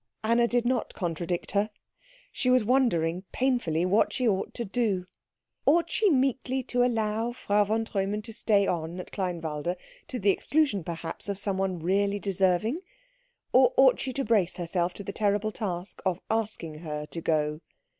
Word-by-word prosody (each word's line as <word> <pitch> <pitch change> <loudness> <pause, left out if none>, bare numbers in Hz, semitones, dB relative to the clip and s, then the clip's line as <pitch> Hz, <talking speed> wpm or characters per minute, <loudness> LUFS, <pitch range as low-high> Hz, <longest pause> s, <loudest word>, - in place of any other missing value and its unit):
Anna 235 +2 +3
did 240 0 +1
not 250 -1 0
contradict 175 0 -3
her. 205 +2 +1 0.6
She 255 - -1
was 250 -3 +4
wondering 185 -9 +2
painfully 240 -11 +1
what 200 +4 +3
she 255 - 0
ought 195 -3 0
to 235 - -3
do. 200 -4 0 0.6
Ought 335 +4 +4
she 430 -2 +3
meekly 265 -2 +1
to 245 -1 +1
allow 225 -1 0
Frau 205 -3 +2
von 220 +2 0
Treumann 205 0 -2
to 225 +1 -9
stay 210 -2 +2
on 170 -1 -2
at 180 - -8
Kleinwalde, 170 -3 -2 0.3
to 255 - -4
the 200 -3 +3
exclusion, 280 - +1
perhaps, 165 +3 -6
of 200 - -2
someone 195 -2 -1
really 200 +4 +1
deserving? 195 - +1 0.7
Or - - +5
ought - - +6
she 265 - -2
to 275 +2 -2
brace 200 -6 +2
herself 175 0 -1
to 200 - -7
the 200 - -5
terrible 210 0 +1
task 185 -4 -5
of 185 -2 0
asking 205 -8 -2
her 150 -2 -5
to 165 +2 -6
go? 155 -1 0
200 Hz, 165 wpm, -28 LUFS, 175-235 Hz, 0.7 s, ought